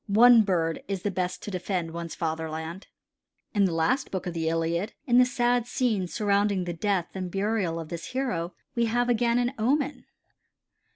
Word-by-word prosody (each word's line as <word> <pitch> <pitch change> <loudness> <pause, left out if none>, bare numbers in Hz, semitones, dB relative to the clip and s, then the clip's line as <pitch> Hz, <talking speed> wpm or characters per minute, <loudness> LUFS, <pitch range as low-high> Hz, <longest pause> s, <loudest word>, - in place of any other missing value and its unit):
One 230 +3 +7
bird 170 -5 0
is 195 -2 -3
the 205 - 0
best 180 -1 -3
to 205 - -5
defend 180 -2 -2
one's 170 0 -6
fatherland." 160 +2 -4 0.7
In 205 -2 +4
the 185 - +1
last 245 +12 +1
book 190 -2 -4
of 175 - -3
the 160 -1 -1
Iliad 165 +4 -1
in 245 -3 +5
the 250 - +7
sad 245 -1 +1
scenes 220 -9 0
surrounding 200 -2 +1
the 175 -1 -3
death 185 0 0
and 185 -1 -4
burial 195 -3 -1
of 160 -2 -7
this 170 -1 -5
hero 190 -10 -2 0.2
we 235 -2 +1
have 240 +2 +1
again 235 0 +2
an 245 +1 +1
omen. 280 +5 0
195 Hz, 180 wpm, -27 LUFS, 170-240 Hz, 0.7 s, One